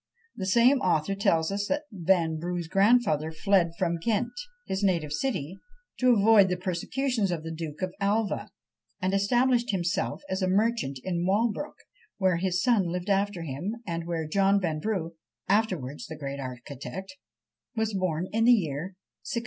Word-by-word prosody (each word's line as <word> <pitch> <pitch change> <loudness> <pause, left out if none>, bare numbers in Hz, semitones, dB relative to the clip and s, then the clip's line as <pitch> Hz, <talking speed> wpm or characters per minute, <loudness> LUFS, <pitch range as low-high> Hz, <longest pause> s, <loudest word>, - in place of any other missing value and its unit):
The 190 - -4
same 240 +7 +5
author 180 -3 +1
tells 165 -4 +1
us 205 +1 -2
that 295 +1 -1
Vanbrugh's 175 -2 0
grandfather 195 -6 +3
fled 170 0 +2
from 170 -2 0
Ghent, 225 +6 0 0.3
his 190 +1 -2
native 170 -7 +1
city, 185 - -2 0.4
to 255 -2 +5
avoid 205 -2 +6
the 180 - -1
persecutions 200 +5 -1
of 170 -3 -3
the 165 - -5
Duke 160 +1 -6
of 185 -1 -2
Alva, 205 +1 0 0.5
and 185 0 -1
established 240 +5 +2
himself 185 +6 -1
as 190 +1 -2
a 185 - +1
merchant 195 - +1
in 175 -2 -1
Walbrook, 225 +8 0 0.4
where 185 -3 +2
his 180 +1 0
son 225 -8 +3
lived 180 +3 -2
after 195 -2 0
him, 165 - -4
and 170 -1 -4
where 165 -2 -2
John 195 +4 +3
Vanbrugh 170 +1 -2 0.4
(afterwards 185 - 0
the 160 - -8
great 140 -1 -5
architect) 135 - -7 0.6
was 220 -1 -1
born 180 -3 -1
in 225 +1 +2
the 245 - +8
year 175 - -1 0.4
1666. 235 - +1
190 Hz, 155 wpm, -27 LUFS, 165-210 Hz, 0.6 s, the